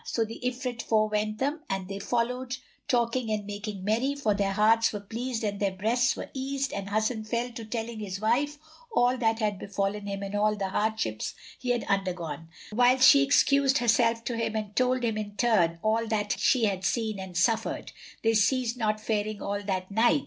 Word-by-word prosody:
So 230 Hz, -, -1 dB
the 225 Hz, +1 st, -8 dB
Ifrit 250 Hz, -1 st, -2 dB
forewent 215 Hz, -1 st, +1 dB
them 285 Hz, +6 st, -1 dB
and 195 Hz, -1 st, -2 dB
they 195 Hz, +1 st, -5 dB
followed, 250 Hz, +4 st, -1 dB, 0.3 s
talking 240 Hz, -2 st, +1 dB
and 210 Hz, -1 st, -1 dB
making 205 Hz, -1 st, -6 dB
merry, 235 Hz, +7 st, +1 dB
for 250 Hz, -7 st, +1 dB
their 200 Hz, -1 st, 0 dB
hearts 225 Hz, +3 st, +4 dB
were 210 Hz, -, -4 dB
pleased 230 Hz, +3 st, -4 dB
and 205 Hz, -2 st, -2 dB
their 200 Hz, -, +2 dB
breasts 235 Hz, +6 st, +1 dB
were -, -, -7 dB
eased 275 Hz, +1 st, -2 dB
and 195 Hz, 0 st, -4 dB
Hasan 220 Hz, +1 st, 0 dB
fell 235 Hz, +3 st, -2 dB
to 230 Hz, -1 st, -7 dB
telling 225 Hz, 0 st, -4 dB
his 195 Hz, -2 st, -5 dB
wife 265 Hz, +8 st, +1 dB, 0.3 s
all 245 Hz, -, +3 dB
that 225 Hz, -1 st, +2 dB
had 210 Hz, -4 st, -1 dB
befallen 200 Hz, +1 st, -2 dB
him 200 Hz, 0 st, -4 dB
and 200 Hz, 0 st, -5 dB
all 210 Hz, +1 st, +2 dB
the 195 Hz, -2 st, -2 dB
hardships 210 Hz, -, -1 dB, 0.2 s
he 250 Hz, -, -4 dB
had 245 Hz, -1 st, +1 dB
undergone, 175 Hz, -5 st, -2 dB, 0.3 s
whilst 250 Hz, +3 st, +5 dB
she 280 Hz, -, +8 dB
excused 275 Hz, -1 st, +4 dB
herself 230 Hz, -1 st, +2 dB
to 240 Hz, -, -3 dB
him 230 Hz, -1 st, -2 dB
and 210 Hz, -1 st, -4 dB
told 255 Hz, 0 st, +2 dB
him, 225 Hz, -2 st, 0 dB
in 205 Hz, -1 st, -6 dB
turn, 195 Hz, -7 st, +2 dB
all 225 Hz, +1 st, +1 dB, 0.3 s
she 245 Hz, -4 st, +3 dB
had 195 Hz, -3 st, -1 dB
seen 215 Hz, +1 st, -1 dB
and 185 Hz, -2 st, -6 dB
suffered. 220 Hz, +4 st, 0 dB, 0.3 s
They 225 Hz, 0 st, +3 dB
ceased 240 Hz, +2 st, +2 dB
not 215 Hz, -2 st, 0 dB
faring 215 Hz, -1 st, -2 dB
all 200 Hz, 0 st, -3 dB
that 190 Hz, -1 st, -3 dB
night. 225 Hz, +7 st, +4 dB
220 Hz, 190 wpm, -28 LUFS, 205-245 Hz, 0.3 s, she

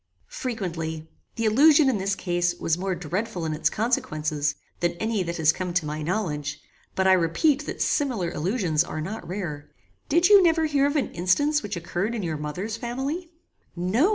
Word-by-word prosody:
"Frequently. 165 Hz, -9 st, -4 dB, 0.3 s
The 230 Hz, -, -1 dB
illusion, 285 Hz, +6 st, +6 dB
in 245 Hz, -6 st, +2 dB
this 195 Hz, +1 st, 0 dB
case, 175 Hz, -1 st, 0 dB
was 160 Hz, -, 0 dB
more 185 Hz, +1 st, -2 dB
dreadful 180 Hz, +3 st, -3 dB
in 155 Hz, -, -1 dB
its 160 Hz, +1 st, +1 dB
consequences, 155 Hz, -, -1 dB, 0.2 s
than 175 Hz, 0 st, +1 dB
any 220 Hz, +3 st, -1 dB
that 170 Hz, -1 st, -3 dB
has 160 Hz, -1 st, +4 dB
come 180 Hz, +1 st, -4 dB
to 180 Hz, -4 st, +2 dB
my 150 Hz, +1 st, -4 dB
knowledge; 150 Hz, -4 st, -2 dB, 0.4 s
but, 190 Hz, -, +1 dB
I 190 Hz, -, +6 dB
repeat 185 Hz, -, +2 dB
that -, -, -2 dB
similar 235 Hz, -, 0 dB
illusions 175 Hz, -2 st, +1 dB
are 160 Hz, -, -6 dB
not 195 Hz, +8 st, -5 dB
rare. 170 Hz, -6 st, -5 dB, 0.4 s
Did 340 Hz, +4 st, +4 dB
you 405 Hz, -1 st, +8 dB
never 325 Hz, -2 st, +3 dB
hear 285 Hz, -2 st, +2 dB
of 285 Hz, -, -2 dB
an 290 Hz, -, 0 dB
instance 290 Hz, -, +2 dB
which 205 Hz, -5 st, -4 dB
occurred 175 Hz, +6 st, -2 dB
in 215 Hz, -, -3 dB
your 160 Hz, -3 st, -2 dB
mother's 180 Hz, +9 st, -4 dB
family?" 270 Hz, +9 st, -4 dB, 0.5 s
"No. 195 Hz, -, +2 dB
185 Hz, 180 wpm, -25 LUFS, 165-245 Hz, 0.5 s, you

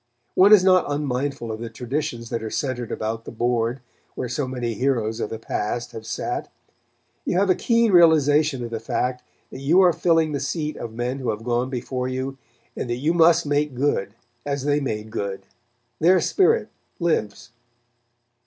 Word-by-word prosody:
One 195 Hz, +3 st, +6 dB
is 210 Hz, -4 st, +8 dB
not 185 Hz, -5 st, +4 dB
unmindful 140 Hz, -4 st, -2 dB
of 110 Hz, -, -5 dB
the 115 Hz, 0 st, -5 dB
traditions 120 Hz, 0 st, -4 dB
that 115 Hz, -, -2 dB
are 110 Hz, -, -4 dB
centered 125 Hz, -2 st, -3 dB
about 110 Hz, +1 st, -3 dB
the -, -, -8 dB
board 120 Hz, +2 st, -1 dB, 0.3 s
where 125 Hz, -, -3 dB
so 130 Hz, +3 st, -2 dB
many 125 Hz, -2 st, -3 dB
heroes 115 Hz, -2 st, 0 dB
of 110 Hz, -, -2 dB
the 115 Hz, -, -5 dB
past 115 Hz, +2 st, -3 dB
have 110 Hz, -1 st, -9 dB
sat. -, -, -3 dB, 0.7 s
You -, -, -1 dB
have 195 Hz, 0 st, +3 dB
a -, -, +6 dB
keen 230 Hz, -2 st, +2 dB
realization 155 Hz, -5 st, +4 dB
of 115 Hz, -, -6 dB
the 115 Hz, -, -3 dB
fact 125 Hz, +3 st, -2 dB, 0.3 s
that -, -, -8 dB
you 150 Hz, +7 st, +3 dB
are 180 Hz, -2 st, +5 dB
filling 165 Hz, -2 st, +2 dB
the 140 Hz, -, -2 dB
seat 150 Hz, +3 st, -3 dB
of 115 Hz, -, -6 dB
men 120 Hz, +4 st, -3 dB
who 130 Hz, -, -2 dB
have 105 Hz, +1 st, -3 dB
gone 120 Hz, +2 st, 0 dB
before 125 Hz, 0 st, -3 dB
you, 130 Hz, +1 st, -4 dB, 0.4 s
and 120 Hz, -, -4 dB
that 120 Hz, -, 0 dB
you 150 Hz, +7 st, 0 dB
must 170 Hz, -1 st, +5 dB
make 145 Hz, -1 st, 0 dB
good, 120 Hz, -7 st, 0 dB, 0.3 s
as 140 Hz, -2 st, -3 dB
they 145 Hz, 0 st, +2 dB
made 110 Hz, -6 st, -4 dB
good. 95 Hz, -2 st, -4 dB, 0.5 s
Their 180 Hz, +3 st, +5 dB
spirit 440 Hz, -, +2 dB, 0.3 s
lives. 120 Hz, -, -1 dB
130 Hz, 180 wpm, -23 LUFS, 115-155 Hz, 0.7 s, is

